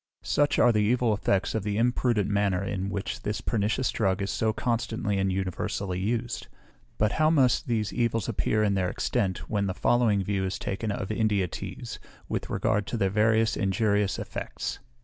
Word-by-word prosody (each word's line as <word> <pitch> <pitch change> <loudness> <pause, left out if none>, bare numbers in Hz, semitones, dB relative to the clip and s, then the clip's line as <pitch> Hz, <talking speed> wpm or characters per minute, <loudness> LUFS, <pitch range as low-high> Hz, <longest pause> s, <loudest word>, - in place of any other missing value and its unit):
Such 145 0 +2
are 120 - +6
the 105 - +2
evil 115 +1 +2
effects 100 -2 0
of 110 - 0
the 100 +1 -2
imprudent 120 -3 +2
manner 100 -2 +1
in 100 -1 -2
which 100 0 -4
this 105 - -2
pernicious 110 +4 0
drug 95 -4 +1
is 100 - -2
so 110 -1 +1
constantly 115 -3 -1
and 95 0 +1
universally 95 0 -2
used. 115 +4 -2 0.5
But 105 0 +2
how 155 -1 +3
must 135 -6 +3
these 110 -4 -1
evils 115 -4 0
appear 110 -1 +1
in 105 -1 +2
their 95 -2 +1
extent, 95 0 -1
when 100 -2 0
the 95 - -2
following 115 -5 +2
view 100 0 -1
is 95 0 -2
taken 100 +3 -3
of 100 0 -3
India 105 -4 +1
teas, - - -7 0.3
with - - -3
regard 105 -1 0
to 120 - -2
their 95 -3 +1
variety 110 +2 +3
of 115 - 0
injurious 100 +1 +1
EFFECTS. - - -5
105 Hz, 185 wpm, -27 LUFS, 100-115 Hz, 0.5 s, are